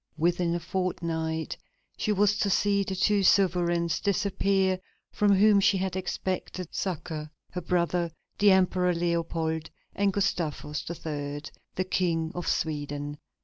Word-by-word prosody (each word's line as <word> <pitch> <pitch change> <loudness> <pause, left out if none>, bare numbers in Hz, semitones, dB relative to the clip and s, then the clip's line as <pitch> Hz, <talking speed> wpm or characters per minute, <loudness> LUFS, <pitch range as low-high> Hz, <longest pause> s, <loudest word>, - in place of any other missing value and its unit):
Within 170 +1 +1
a - - -1
fortnight 165 -3 -2 0.4
she 215 - -1
was 205 0 +3
to 200 - +2
see 200 +1 +2
the 190 -1 -2
two 205 +2 +3
sovereigns 175 -3 +3
disappear 195 -1 +1 0.3
from 205 -1 +3
whom 205 +1 +6
she 200 0 +4
had 190 -1 -2
expected 185 -1 -3
succor: 160 -4 -3 0.2
her 180 - -4
brother, 175 0 0 0.3
the 205 0 +6
Emperor 185 -2 +3
Leopold, 165 -2 -1 0.2
and 200 0 +2
Gustavus 165 -7 -2
III., 145 -3 -4 0.3
the 185 - +1
King 165 -4 0
of 175 - -5
Sweden. 145 -1 -2
180 Hz, 130 wpm, -28 LUFS, 160-190 Hz, 0.4 s, whom